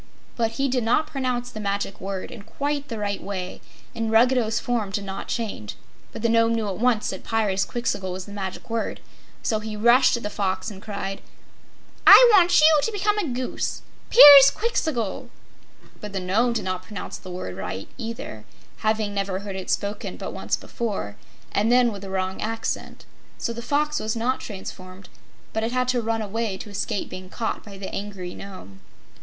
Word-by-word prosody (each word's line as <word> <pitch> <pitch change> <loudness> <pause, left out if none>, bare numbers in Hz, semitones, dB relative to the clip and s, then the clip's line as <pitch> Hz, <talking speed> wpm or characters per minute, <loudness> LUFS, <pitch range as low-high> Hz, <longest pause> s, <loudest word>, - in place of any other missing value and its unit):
But 225 -1 0
he 275 +3 0
did 250 -2 0
not 240 +8 +2
pronounce 255 -4 -2
the 215 - -7
Magic 200 -1 -3
Word 190 -1 -5
in 225 - -9
quite 285 +6 -3
the 230 - -5
right 205 -1 -2
way, 185 -2 -5 0.3
and 225 -1 -2
Ruggedo's 230 0 +3
form 235 -5 -1
did 200 +1 -3
not 195 0 -6
change. 210 - -4 0.4
But 225 - -8
the - - +4
Nome 230 0 +3
knew 220 -2 -1
at 195 -1 -4
once 240 -2 +2
that 190 - -7
"Pyrzqxgl!" 210 -2 -1
was 185 0 -5
the 205 - -11
Magic 195 -2 -6
Word, 230 -1 -2 0.4
so 220 - +1
he 215 0 -6
rushed 240 +3 +5
at 235 - -8
the 210 - -3
Fox 200 +2 -2
and 195 -2 -10
cried: 200 -2 -5 0.9
"I - - +11
want 360 -3 +6
you 310 0 +7
to 450 - -1
become 420 0 +1
a 380 - -1
Goose 255 -1 -3 0.3
Pyrzqxgl!" 285 - +7 0.7
But 210 -2 -8
the 195 - -1
Nome 215 +7 +1
did 230 - -2
not 185 -1 -2
pronounce 200 +1 -7
the 185 - -11
word 180 - -5
aright, 95 +1 -5
either, 225 - -6 0.3
having 215 -1 0
never 195 -1 -2
heard 200 -1 -6
it 190 -1 -6
spoken 205 +1 -2
but - - -6
once - - -1
before, 200 - -4 0.4
and 215 +3 +1
then 245 -1 +5
with 200 -2 -8
a 195 - -7
wrong 190 0 -2
accent. 225 +1 -4 0.3
So 235 - -3
the 235 - -6
Fox 300 +4 0
was 220 +1 -2
not 245 +3 0
transformed, 190 -2 -9 0.4
but 220 - -1
it 225 - -1
had 250 0 0
to 250 -1 +2
run 225 0 -1
away 215 -1 -2
to 210 - -9
escape 200 0 -2
being 185 0 -8
caught 225 +3 -3
by 200 -2 -11
the 195 0 -7
angry 195 -3 -5
Nome. 100 - -10
220 Hz, 185 wpm, -24 LUFS, 195-240 Hz, 0.9 s, I